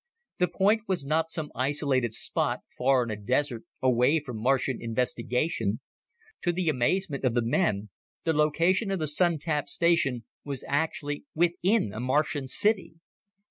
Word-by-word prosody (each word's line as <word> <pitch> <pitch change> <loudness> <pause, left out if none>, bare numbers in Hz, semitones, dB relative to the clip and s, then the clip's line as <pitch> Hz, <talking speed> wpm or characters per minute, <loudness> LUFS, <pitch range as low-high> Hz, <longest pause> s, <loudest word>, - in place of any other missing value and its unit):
The 180 - +4
point 210 +4 +2
was 185 -7 -1
not 160 +3 +1
some 160 -3 -5
isolated 130 -2 0
spot - - -2
far 130 0 +3
in 115 - -4
a - - -2
desert, 125 +3 -1 0.2
away 130 +4 +4
from 125 -7 -7
Martian 130 0 +1
investigation. 115 -1 -1 0.6
To 175 - +1
the 175 -1 0
amazement 150 +3 0
of 125 -3 +1
the 120 - +2
men, 110 - 0 0.3
the 165 - +1
location 165 +7 +2
of 195 - 0
the 155 - -1
Sun 165 +3 +2
tap 150 -1 -2
station 140 -7 +2 0.2
was 140 -3 -5
actually 145 - -1
within 175 - +2
a 110 - -5
Martian 140 +2 0
city! 200 +5 0
145 Hz, 150 wpm, -28 LUFS, 125-170 Hz, 0.6 s, The